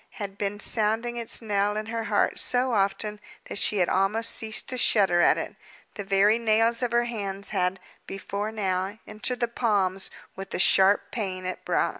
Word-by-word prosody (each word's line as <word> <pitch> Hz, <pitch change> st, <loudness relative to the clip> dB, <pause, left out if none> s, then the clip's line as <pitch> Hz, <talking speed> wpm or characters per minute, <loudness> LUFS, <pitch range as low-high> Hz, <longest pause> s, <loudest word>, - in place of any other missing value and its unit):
had 200 Hz, -2 st, -6 dB
been 205 Hz, 0 st, -4 dB
sounding 225 Hz, +3 st, +1 dB
its 235 Hz, 0 st, +3 dB
knell 205 Hz, -1 st, 0 dB
in 215 Hz, -, -4 dB
her 225 Hz, 0 st, -4 dB
heart 205 Hz, -1 st, 0 dB
so 250 Hz, 0 st, +1 dB
often 210 Hz, +1 st, -1 dB, 0.3 s
that -, -, -4 dB
she 210 Hz, -, +1 dB
had 180 Hz, -2 st, +2 dB
almost 210 Hz, +4 st, +1 dB
ceased 220 Hz, -2 st, +1 dB
to 255 Hz, -, -2 dB
shudder 195 Hz, -7 st, +2 dB
at -, -, +4 dB
it. -, -, -6 dB, 0.4 s
The 205 Hz, -, -6 dB
very 200 Hz, +3 st, +3 dB
nails 225 Hz, +1 st, +2 dB
of 245 Hz, -, -1 dB
her 240 Hz, 0 st, +2 dB
hands 200 Hz, -4 st, -4 dB
had, 185 Hz, -1 st, -1 dB, 0.3 s
before 200 Hz, +2 st, -5 dB
now, 195 Hz, -1 st, -2 dB
entered 245 Hz, +4 st, -5 dB
the 240 Hz, -, +2 dB
palms, 200 Hz, -5 st, 0 dB, 0.3 s
with 195 Hz, 0 st, -8 dB
the -, -, -4 dB
sharp 190 Hz, +2 st, +3 dB
pain 190 Hz, -5 st, -4 dB
it 185 Hz, -, -5 dB
brought. -, -, 0 dB
210 Hz, 185 wpm, -25 LUFS, 195-225 Hz, 0.4 s, at